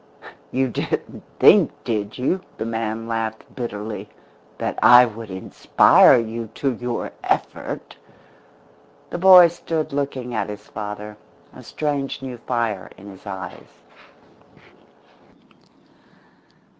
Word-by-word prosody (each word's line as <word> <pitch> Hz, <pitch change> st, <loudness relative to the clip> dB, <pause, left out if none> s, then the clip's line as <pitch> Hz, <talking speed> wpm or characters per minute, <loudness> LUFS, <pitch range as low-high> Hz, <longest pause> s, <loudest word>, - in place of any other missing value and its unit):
"You 130 Hz, +1 st, 0 dB
didn't 120 Hz, -, -4 dB, 0.2 s
think, -, -, +6 dB
did 105 Hz, -2 st, -3 dB
you," 155 Hz, +9 st, 0 dB, 0.2 s
the -, -, -4 dB
man 115 Hz, 0 st, -3 dB
laughed 110 Hz, -1 st, -3 dB
bitterly, 105 Hz, -3 st, -6 dB, 0.5 s
"that -, -, -3 dB
I 125 Hz, 0 st, +8 dB
would 115 Hz, -1 st, -8 dB
inspire 95 Hz, +5 st, +4 dB
you 115 Hz, 0 st, -3 dB
to 135 Hz, -2 st, -1 dB
your 120 Hz, 0 st, -4 dB
effort?" -, -, -3 dB, 1.1 s
The 175 Hz, -, -4 dB
boy 185 Hz, -1 st, +9 dB
stood 165 Hz, -3 st, -4 dB
looking 135 Hz, -3 st, -3 dB
at -, -, -2 dB
his 105 Hz, 0 st, -8 dB
father, 105 Hz, 0 st, -7 dB, 0.4 s
a -, -, -12 dB
strange 140 Hz, -3 st, -3 dB
new 125 Hz, -2 st, -7 dB
fire 115 Hz, -6 st, -2 dB
in 100 Hz, +1 st, -11 dB
his 95 Hz, +2 st, -15 dB
eyes. 95 Hz, -1 st, -9 dB
115 Hz, 110 wpm, -22 LUFS, 105-130 Hz, 1.1 s, boy